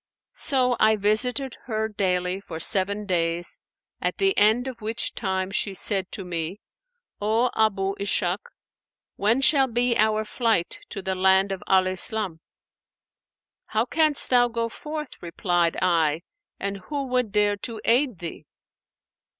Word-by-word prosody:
So 255 -4 +1
I 220 0 +5
visited 240 +6 0
her 220 -2 -1
daily 185 -3 -1
for 165 -5 -8
seven 200 +4 +1
days, 170 -2 -1 0.4
at - - -1
the 390 0 +2
end 220 +4 +4
of 255 -3 -7
which 220 +2 -3
time 190 -3 -2
she 195 0 -2
said 195 -1 +1
to 195 - -5
me, 170 +2 -4 0.6
'O 225 +4 +1
Abu 195 -3 +1
Ishak, 195 -1 0 0.8
when 225 +6 +2
shall 270 -1 +4
be 240 0 +1
our 215 0 +2
flight 225 -6 0
to 195 -3 -6
the 190 - -1
land 190 +1 +3
of 190 - -4
Al 190 -1 +4
Islam?' 185 -1 0 1.3
'How 220 +2 0
canst 305 +1 +2
thou 245 -1 +5
go 230 -1 -2
forth,' 300 +3 -7
replied 175 -1 0
I, 165 -3 +1 0.4
'and 200 0 -3
who 290 -2 -2
would 250 -4 -1
dare 205 0 +2
to 225 +1 -6
aid 245 -1 +3
thee?' 170 -1 -8
210 Hz, 140 wpm, -24 LUFS, 185-240 Hz, 1.3 s, I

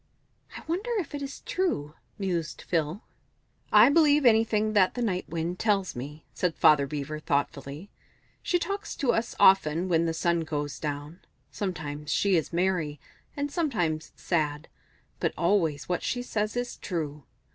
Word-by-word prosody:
"I - - -10
wonder 365 +8 -2
if 360 -6 -3
it 290 - -4
is 275 0 -6
true?" 150 - -1 0.2
mused 170 -8 -3
Phil 165 +3 -1 0.7
"I 215 +4 +8
believe 295 -2 +5
anything 220 -2 +3
that 190 -3 +4
the 245 - -2
Night 185 -5 -1
Wind 170 +2 -3
tells 200 -4 +1
me," 145 +5 -7
said 180 -3 -1
Father 145 -2 +5
Beaver, 150 +1 -4
thoughtfully. 145 +3 -2 0.5
"She 355 - +1
talks 400 +4 -4
to 260 -4 +1
us 225 +1 -1
often 185 -3 +5
when 165 -1 +3
the 165 - 0
sun 170 0 +1
goes 150 -3 -3
down; 145 +3 -5 0.3
sometimes 150 -6 -4
she 200 -2 +3
is 160 - 0
merry, 170 -4 0 0.4
and 285 0 -2
sometimes 175 - -1
sad, 150 -4 -1 0.5
but - - 0
always 170 -5 +1
what 180 - -1
she 245 -1 -2
says 215 -1 -2
is 245 0 -3
true. 150 -5 -4
175 Hz, 155 wpm, -27 LUFS, 150-220 Hz, 0.7 s, I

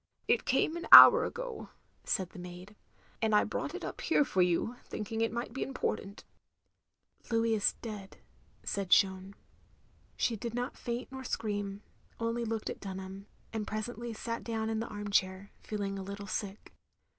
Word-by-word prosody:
"It - - +2
came 315 - +1
an 340 - -6
hour 480 -1 +12
ago," - - -6 0.4
said 185 -2 -1
the - - -11
maid, 180 +3 -10 0.5
"and 220 -1 +2
I 210 - +5
brought 290 +8 -4
it - - -5
up - - -6
here 295 -3 +3
for 190 - +1
you, 180 +7 +1
thinking 220 +1 -4
it 225 - +1
might 235 0 -4
be 270 - -5
important." 215 -6 -3 0.3
" - - -51
— - - -43
^Louis 230 -1 +1
is 210 -3 +2
dead, 210 -4 -7 0.2
" - - -34
said 200 -2 -3
Jeanne. 190 +1 +3 0.8
She 235 - +1
did 230 +2 -5
not 245 +2 -3
faint 240 +2 -5
nor 265 0 -7
scream, 205 -4 -3 0.4
only 230 +1 -1
looked 225 -1 -3
at - - -8
Dtmham; 190 0 -7 0.3
and 215 -2 -3
presently 235 +2 -4
sat 230 +1 -5
down 225 -1 -2
in 220 - -1
the 230 - -3
arm 205 -1 -6
chair, 190 0 0
feeling 200 -2 -4
a - - -5
little 200 +1 -7
sick. 200 0 -5
215 Hz, 180 wpm, -31 LUFS, 195-235 Hz, 0.8 s, hour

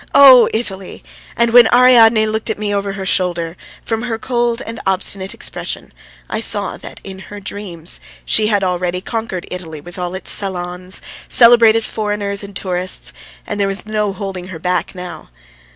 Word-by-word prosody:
oh, 265 -3 +9
Italy! 195 -4 -3 0.3
And 235 -1 +2
when 240 -2 +7
Ariadne 235 -3 +6
looked 220 +1 -2
at 220 - -1
me 205 -1 -2
over 200 -1 -2
her 195 -1 -6
shoulder, 175 -3 0 0.3
from 225 -1 -2
her 235 -2 -3
cold 240 +1 -1
and 225 0 -7
obstinate 190 0 0
expression - - -6 0.3
I 215 - -3
saw 205 -3 +1
that - - -11
in 190 -1 -9
her 205 - -8
dreams 190 -4 -4 0.3
she 215 -1 +2
had 205 -2 +1
already 180 -1 -1
conquered 220 -4 -4
Italy 165 -4 -6
with 175 +5 -10
all 180 0 -3
its 190 - -1
salons, 180 -1 -2 0.2
celebrated 230 -2 +6
foreigners 205 -2 -3
and 200 -1 -10
tourists, 185 -1 -2 0.3
and 205 - -4
there 200 - +2
was 195 +1 -1
no 210 -1 -1
holding 190 -2 -6
her 185 -3 -7
back 180 +3 -2
now. 180 -1 -8
200 Hz, 170 wpm, -17 LUFS, 185-225 Hz, 0.3 s, oh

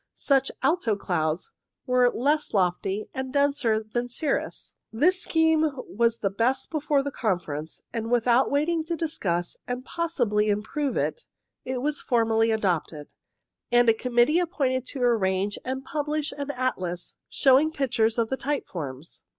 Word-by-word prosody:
Such 270 -1 +2
alto 270 - +2
clouds 170 - -2 0.3
were 250 -1 +4
less 290 +3 0
lofty 190 +2 0
and 265 0 -4
denser 280 -6 +2
than 240 +3 -3
cirrus. 280 +4 -3 0.2
This 350 +11 +2
scheme 320 -1 +3 0.2
was 230 +2 0
the 195 - 0
best 235 +6 0
before 295 -2 +1
the 285 - -3
Con 215 -9 0
ference, 155 -1 -6
and 225 -1 -3
without 245 +1 +3
waiting 315 +3 +1
to 335 +1 -2
discuss, 185 - -2
and 250 +1 -4
possibly 240 -12 0
improve 220 +7 -1
it, - - -2 0.4
it 255 -1 -3
was 295 0 -1
formally 225 -2 +2
adopted, 175 -8 -1 0.6
and 240 -1 +5
a - - +6
committee 245 +7 +2
appointed 265 -8 -1
to 265 -3 -3
arrange 200 -4 +1
and 265 +1 -4
publish 300 +1 -2
an 285 -1 -5
atlas 185 -10 -3 0.2
showing 275 +3 +4
pictures 230 -6 0
of 230 -1 +1
the 265 - -1
type 290 +1 -2
forms. 145 -2 -7
245 Hz, 150 wpm, -26 LUFS, 215-285 Hz, 0.6 s, a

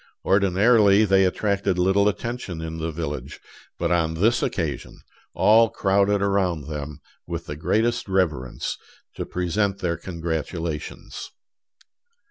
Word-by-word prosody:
Ordinarily 100 +2 +4
they 95 -1 +4
attracted 100 0 0
little 95 +3 +3
attention 110 -5 -5
in 80 0 -5
the 80 +1 -2
village; 75 -3 -5 0.4
but - - -1
on 80 -2 +1
this 110 +8 +2
occasion - - -3 0.3
all 115 +1 +5
crowded 100 0 +2
around 95 -6 +1
them 75 -1 -6 0.3
with 85 0 -5
the 75 - -6
greatest 115 +9 0
reverence, 80 -10 -1 0.4
to - - -5
present 95 +3 -1
their 85 -4 -2
congratulations. 80 -2 -5
95 Hz, 115 wpm, -24 LUFS, 80-100 Hz, 0.4 s, all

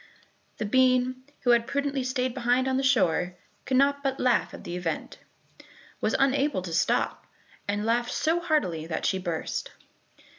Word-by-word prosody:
The 215 - -2
bean, 255 +2 +2 0.2
who 245 - +3
had 235 0 +3
prudently 280 -1 -1
stayed 255 -1 -1
behind 250 +1 +1
on 260 0 +1
the - - +1
shore, 185 -9 +2 0.3
could 260 - +1
not 280 +1 +3
but 270 -1 -2
laugh 250 -2 +2
at - - -10
the 175 - -5
event, 175 -3 -4 0.8
was - - +1
unable 275 -6 +1
to 170 -3 -5
stop, 165 - 0 0.4
and 205 +1 -1
laughed 240 +1 +1
so 325 +2 +1
heartily 295 - 0
that 160 - -3
she 190 - +1
burst. 170 -3 -3
255 Hz, 160 wpm, -27 LUFS, 190-270 Hz, 0.8 s, who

